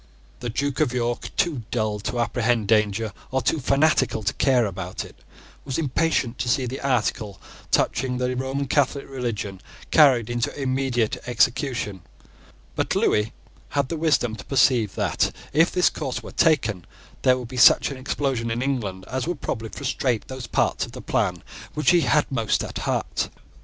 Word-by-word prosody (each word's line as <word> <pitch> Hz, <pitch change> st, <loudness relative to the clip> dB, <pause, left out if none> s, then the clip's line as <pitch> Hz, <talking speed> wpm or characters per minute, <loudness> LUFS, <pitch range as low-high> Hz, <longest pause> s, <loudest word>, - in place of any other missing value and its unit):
The 120 Hz, -, -4 dB
Duke 140 Hz, +4 st, -2 dB
of 150 Hz, -6 st, +2 dB
York, 120 Hz, -1 st, -2 dB
too 170 Hz, -10 st, +1 dB
dull 110 Hz, -3 st, -1 dB
to 120 Hz, +3 st, -3 dB
apprehend 120 Hz, -2 st, +1 dB
danger, 105 Hz, 0 st, +2 dB, 0.2 s
or 130 Hz, -1 st, -1 dB
too 155 Hz, -, +1 dB
fanatical 135 Hz, -5 st, +2 dB
to 100 Hz, -, 0 dB
care 130 Hz, -4 st, +3 dB
about 95 Hz, -2 st, -5 dB
it, -, -, -14 dB, 0.5 s
was 135 Hz, -2 st, -3 dB
impatient 145 Hz, -4 st, 0 dB
to 120 Hz, 0 st, -1 dB
see 130 Hz, +1 st, +2 dB
the 130 Hz, +2 st, -5 dB
article 110 Hz, -6 st, -1 dB, 0.3 s
touching 125 Hz, +1 st, +1 dB
the 125 Hz, 0 st, -1 dB
Roman 135 Hz, +2 st, -2 dB
Catholic 140 Hz, 0 st, +1 dB
religion 115 Hz, -7 st, -4 dB, 0.3 s
carried 130 Hz, -8 st, +6 dB
into 120 Hz, +3 st, -2 dB
immediate 130 Hz, -4 st, 0 dB
execution: 120 Hz, -5 st, 0 dB, 0.7 s
but -, -, 0 dB
Lewis 105 Hz, 0 st, +2 dB, 0.5 s
had 140 Hz, -2 st, +1 dB
the 165 Hz, -, -2 dB
wisdom 150 Hz, -8 st, +1 dB
to -, -, -9 dB
perceive 120 Hz, -5 st, +3 dB
that, -, -, +1 dB, 0.2 s
if 165 Hz, +4 st, +4 dB
this 180 Hz, -, +3 dB
course 135 Hz, -5 st, -4 dB
were -, -, -8 dB
taken, 115 Hz, -, +2 dB, 0.4 s
there 130 Hz, -1 st, +4 dB
would 125 Hz, -2 st, -6 dB
be 130 Hz, -, -8 dB
such 125 Hz, -, +6 dB
an 135 Hz, -, -6 dB
explosion 130 Hz, -3 st, -2 dB
in 115 Hz, +2 st, -1 dB
England 105 Hz, -9 st, -2 dB
as 130 Hz, +3 st, -3 dB
would 175 Hz, -4 st, -2 dB
probably 110 Hz, -4 st, -4 dB
frustrate 125 Hz, -4 st, -2 dB
those 130 Hz, -3 st, -7 dB
parts -, -, +1 dB
of -, -, -7 dB
the -, -, -8 dB
plan -, -, 0 dB, 0.3 s
which 150 Hz, -3 st, +3 dB
he 175 Hz, -1 st, +5 dB
had 150 Hz, -1 st, +3 dB
most 115 Hz, -5 st, +1 dB
at -, -, -5 dB
heart. -, -, -1 dB
125 Hz, 170 wpm, -24 LUFS, 115-140 Hz, 0.7 s, carried